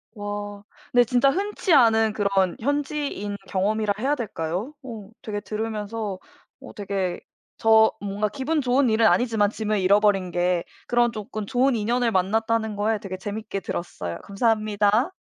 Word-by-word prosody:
와 205 0 -5 0.3
근데 245 0 +6
진짜 250 +3 +3
흔치 395 -1 0
않은 225 -4 +5
그런 195 -3 +1
현지인 285 -5 -2
경험이라 205 +2 0
해야 275 +4 +1
될까요? 200 - -4
어 220 -6 -8
되게 205 -1 -3
들으면서 215 -1 -4 0.4
어 - - -11
되게 195 -3 -2 0.4
저 220 0 +5
뭔가 205 +1 -2
기분 285 +6 -1
좋은 255 0 +2
일은 220 +1 +4
아니지만 220 -4 +3
짐을 215 -1 -1
잃어버린 195 -1 +3
게 175 0 +1 0.2
그런 240 -1 +3
조금 215 -1 -6
좋은 255 +3 +2
인연을 235 +2 +1
만났다는 220 +3 0
거에 210 +1 0
되게 185 -2 -6
재밌게 205 0 -5
들었어요. 90 - -5
감사합니다. 215 - +1
215 Hz, 320 characters per minute, -24 LUFS, 200-235 Hz, 0.4 s, 근데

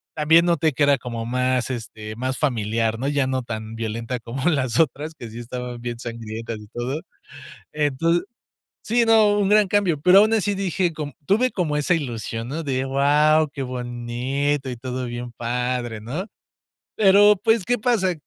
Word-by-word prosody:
También 160 +2 +5
noté 160 -3 +2
que 135 - +1
era 140 -1 +4
como 115 -3 -5
más, 125 +1 0
este, 110 -3 -6
más 130 +1 -2
familiar, 115 -4 0
¿no? 135 - -2
Ya 145 -2 +1
no 130 -1 -1
tan 110 -1 -6
violenta 115 +2 -4
como 130 +8 -2
las 130 -7 0
otras, 155 0 0
que 120 -7 -9
sí 115 +2 -9
estaban 125 0 -6
bien 120 -1 -4
sangrientas 115 -1 -6
y 105 - -13
todo. 125 +5 -3 0.7
Enton 155 +4 +1 0.6
Sí, 235 +1 +2
no, 215 -2 +5
un 200 -1 +2
gran 210 -1 +5
cambio, 185 -7 +1
pero 180 +5 +6
aun 215 +1 +3
así 205 -1 +1
dije 185 -2 -1
com 150 -2 -5
tuve 240 +6 +3
como 160 -8 -1
esa 150 +4 +1
ilusión, 115 -5 -4
¿no?, 160 +4 -4
de, 135 -2 -1
guau, 150 +3 +3
qué 135 - -5
bonito 125 +3 -2
y 125 - -5
todo 130 +1 -4
bien 120 0 -6
padre, 120 -1 -2
¿no? 145 - -5 0.7
Pero 205 0 +6
pues, 225 -3 +3
¿qué 245 0 +1
pasa? 210 -6 +1
135 Hz, 175 wpm, -22 LUFS, 120-165 Hz, 0.7 s, pero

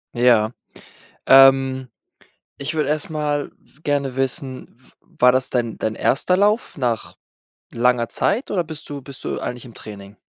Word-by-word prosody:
Ja, 120 -3 +4 0.8
ähm, 135 -1 +6 0.7
ich 140 +3 -4
würde 150 -3 0
erst 155 +5 -1
mal 150 -2 -2 0.3
gerne 140 -3 -1
wissen, 135 -2 -3
w 130 - -24 0.3
war 125 0 +7
das 130 +1 0
dein 120 -3 -2
dein 110 0 -2
erster 180 +11 +1
Lauf 210 +1 +1
nach 120 -4 -2 0.6
langer 120 0 +2
Zeit 225 +7 -1
oder 185 -3 +1
bist 155 -2 -9
du 145 -1 -6
bist 135 0 -12
du - - -3
eigentlich 125 -1 -5
im 120 -3 -13
Training? 100 -1 -11
135 Hz, 150 wpm, -21 LUFS, 125-145 Hz, 0.8 s, war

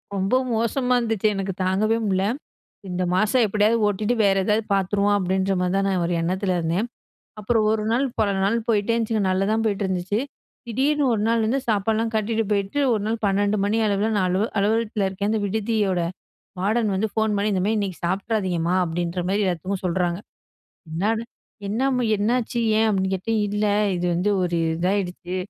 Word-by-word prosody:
ரொம்ப 195 +3 -1 0.2
மோசமா 250 +3 0
இருந்துச்சு. 225 -3 0
எனக்கு 195 0 -3
தாங்கவே 205 +5 +1
முடியல. 190 -1 +1 0.6
"இந்த 180 0 -2
மாசம் 215 +6 +3
எப்படியாவது 215 +3 +2
ஓட்டிட்டு 210 +4 0
வேற 195 -1 +4
ஏதாவது 215 +2 +1
பார்த்துருவோம்" 200 +1 +2
அப்படின்ற 190 +1 0
மாதிரி 180 +1 0
தான் 195 0 +1
நான் 185 -3 0
ஒரு 175 - -1
எண்ணத்தில 185 +2 0
இருந்தேன். 170 +7 -1 0.5
அப்புறம் 220 +1 +1
ஒரு 220 0 0
நாள் 255 +4 +2 0.2
பல 210 -2 +2
நாள் 205 +4 +2
போயிட்டே 215 0 +2
இருந்துச்சுங்க. 225 -2 0
நல்லா 185 +1 +1
தான் 225 0 +1
போயிட்டுருந்துச்சு. 195 -1 -1 0.5
திடீர்னு 280 +5 +1
ஒரு 210 - -1
நாள் 230 -1 +2
வந்து 250 +5 +1
சாப்பாடுலாம் 220 +2 0
கட்டிட்டு 220 +1 0
போயிட்டு, 200 +5 -1
ஒரு 215 - 0
நாள் 225 +1 -1
12:00 205 +1 +1
மணி 205 +2 +1
அளவில 205 +2 +1
நான் 185 - +1
அல 185 - +1 0.2
அலுவலகத்தில 215 0 +1
இருக்கேன். 200 +2 -2
அந்த 220 - 0
விடுதியோட 205 -2 0 0.6
வார்டன் 215 +2 +1
வந்து 215 +3 0
ஃபோன் 220 -1 +1
பண்ணி 205 +1 0
"இந்த 185 - 0
மாதிரி 215 +2 +1
இன்னைக்கு 190 -3 -4
சாப்பிட்றாதீங்கம்மா" 185 -3 0
அப்படின்ற 170 +1 -3
மாதிரி 200 +2 +1
எல்லாத்துக்கும் 185 +2 -3
சொல்றாங்க. 175 0 0 0.7
என்னாது 210 +8 0 0.5
"என்னம்மா 250 +3 0
என்னாச்சு 235 +3 0 0.2
ஏன்? 225 - +3
அப்டின்னு 190 -2 0
கேட்டேன். 220 +4 -1
"இல்ல 210 +1 -1 0.3
இது 175 0 -1
வந்து 180 +5 +1
ஒரு 175 -1 0 0.2
இதாகிடுச்சு 180 0 -2
205 Hz, 165 wpm, -23 LUFS, 190-220 Hz, 0.7 s, வேற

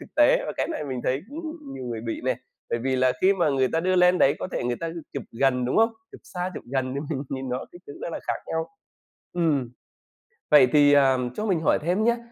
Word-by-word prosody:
thực - - -14
tế, - - +5
và - - -3
cái - - -1
này 315 - -3
mình 130 -3 -4
thấy 130 +2 0
cũng 320 +4 -6 0.3
nhiều 130 -1 -6
người 115 -2 -4
bị 115 0 -4
nè, - - +1 0.3
bởi 120 - 0
vì 130 +2 -1
là 130 0 +3
khi 190 +1 +5
mà 175 -5 +2
người 130 -2 +2
ta 165 - +2
đưa 185 +2 +1
lên 180 0 +5
đấy 140 - +4
có - - -4
thể - - -2
người 120 -1 -1
ta 165 -1 -3 0.2
chụp 140 - -4
gần, 125 +1 +1
đúng 125 - -1
hông? 225 +1 +4 0.2
Chụp - - -12
xa, 180 0 -4
chụp - - -7
gần 130 -1 -1
thì 140 - -2
mình 140 -3 -2
nhìn 130 -1 -4
rất 125 - -1
kích 175 - -14
thước 145 - -9
nó - - -4
là - - -5
khác - - -3
nhau. 160 0 -2 0.6
Ừm, 150 -8 0 0.8
vậy 140 -4 +8
thì, 145 -1 +6
ờ, 135 -2 +5 0.2
cho 215 - -2
mình 185 -6 +1
hỏi 160 - +3
thêm 180 +7 0
nhá, 235 +1 +3
145 Hz, 260 wpm, -25 LUFS, 130-180 Hz, 0.8 s, vậy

